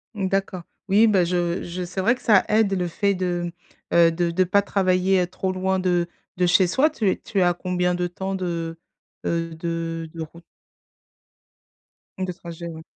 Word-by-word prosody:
D'accord. 195 -2 -1 0.3
Oui, 210 +4 +6
bah, 190 -5 +3
je 175 0 -1
je 180 +1 -5
c'est 180 +2 -5
vrai 230 +6 +3
que 250 - -17
ça 215 -6 +4
aide, 215 -2 +3
le 180 -2 0
fait 200 +4 0
de, 175 -2 -2 0.4
mmh, - - 0
heu, 170 -1 +6
de 170 +1 0
de 185 +2 +3
pas 200 +3 +3
travailler, 190 -1 +2
heu, - - -3
trop 185 +1 -3
loin 190 0 0
de 175 -2 +1 0.3
de 180 - +3
chez 180 +2 +5
soi. 265 - +3
Tu 225 -10 0
es - - -2
tu 200 - -3
es - - +4
à 175 0 +3
combien 180 0 -1
de 180 0 -1
temps 190 +2 -4
de, 170 -3 -3 0.5
heu, 165 0 -1
de 165 0 -4
de 165 - -6
route? 165 +2 -9 1.8
De 180 - -4
trajet, 170 -1 -8
ouais. 160 -1 -8
180 Hz, 195 wpm, -23 LUFS, 170-190 Hz, 1.8 s, Oui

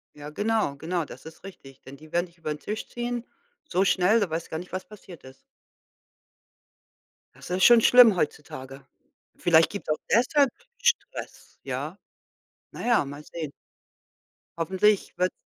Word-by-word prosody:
Ja, 145 0 -9
genau, 210 -3 0
genau, 165 +2 -2
das - - -12
ist 160 +3 -12
richtig. 135 -9 -13
Denn 135 +1 -12
die 155 +1 -16
werden 175 +1 0
dich 170 0 -25
über 155 -2 -3
den 150 - -10
Tisch 215 +6 -5
ziehen, 240 0 -4 0.4
so 185 -6 +1
schnell, 195 +3 +3
da 200 -6 0
weißt 165 +1 -4
gar 160 - -3
nicht, 180 - -10
was 185 0 -4
passiert 190 -5 -14
ist. 130 0 -14 2.0
Das - - -12
ist 185 +1 0
schon 240 -1 +8
schlimm 240 -5 +7
heutzutage. 135 -4 -4 0.5
Vielleicht 165 -1 +4
gibt's 205 - -7
auch 155 - +1
deshalb 260 +4 +4 0.3
Stress, 480 - -2
ja. - - -5 0.7
Na - - -7
ja, 240 -11 +3
mal 145 +2 -8
sehen. 155 -2 -7 1.1
Hoffentlich 190 +4 +1
wird's 180 0 0
180 Hz, 155 wpm, -26 LUFS, 150-210 Hz, 2.0 s, schon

